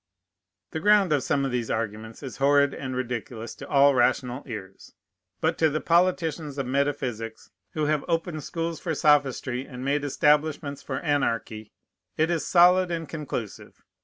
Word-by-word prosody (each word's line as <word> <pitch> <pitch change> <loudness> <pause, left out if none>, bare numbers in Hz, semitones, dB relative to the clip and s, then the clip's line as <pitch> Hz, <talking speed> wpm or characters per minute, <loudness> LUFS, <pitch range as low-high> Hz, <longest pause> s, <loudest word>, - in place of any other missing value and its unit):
The 160 - -3
ground 200 -2 +4
of 145 - +2
some 140 +1 0
of 135 - -2
these 120 -2 -2
arguments 110 +2 -4
is 130 - -7
horrid 140 0 +3
and 130 -2 -5
ridiculous 120 -2 -4
to - - -10
all 140 0 +5
rational 125 +1 +1
ears; 100 -5 -9 0.5
but 160 +1 0
to 160 - +4
the 155 +1 -1
politicians 165 -4 +1
of 135 - -2
metaphysics, 130 -4 -2 0.2
who 155 -1 -1
have 150 -1 +1
opened 165 -2 -2
schools 165 0 -4
for 165 -2 -3
sophistry, 135 -3 +1
and 125 -1 -8
made 145 +1 0
establishments 150 0 +1
for 130 -2 -4
anarchy, 115 -7 -1 0.5
it 160 +2 +2
is 165 -2 -1
solid 180 +1 +5
and 165 -3 -4
conclusive. 140 -9 -6
140 Hz, 160 wpm, -26 LUFS, 125-160 Hz, 0.5 s, all